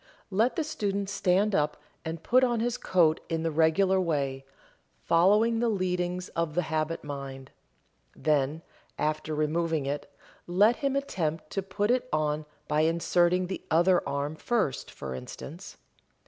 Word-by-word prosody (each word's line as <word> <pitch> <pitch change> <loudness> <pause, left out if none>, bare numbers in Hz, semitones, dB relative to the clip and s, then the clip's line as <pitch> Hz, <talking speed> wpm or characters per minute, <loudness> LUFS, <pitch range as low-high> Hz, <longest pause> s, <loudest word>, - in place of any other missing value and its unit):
Let 220 +6 +2
the 325 - 0
student 200 -10 -2
stand 195 +2 +2
up 150 -3 +1 0.3
and 160 0 -5
put 255 +2 +4
on 240 -2 +2
his 240 +1 0
coat 165 -8 +2
in 165 -1 -1
the 165 - 0
regular 185 +5 +3
way, 140 -6 -1 0.6
following 210 +7 +4
the 235 0 +2
leadings 180 -2 -1
of 165 -2 -2
the 180 - +2
habit 160 +1 -2
mind. 135 -2 -7 0.6
Then, 150 +1 0 0.3
after 155 0 -1
removing 155 0 0
it, 145 +1 -4 0.4
let 205 +7 +4
him 275 -1 -1
attempt 165 - -2
to 195 - -1
put 205 +3 -1
it 255 0 0
on 150 0 0 0.2
by 150 0 +2
inserting 175 +2 +2
the 190 +1 -5
other 175 +3 +4
arm 140 +2 -2
first, 210 - -1
for 65 -2 -7
instance. 160 - -9
170 Hz, 145 wpm, -28 LUFS, 155-195 Hz, 0.6 s, put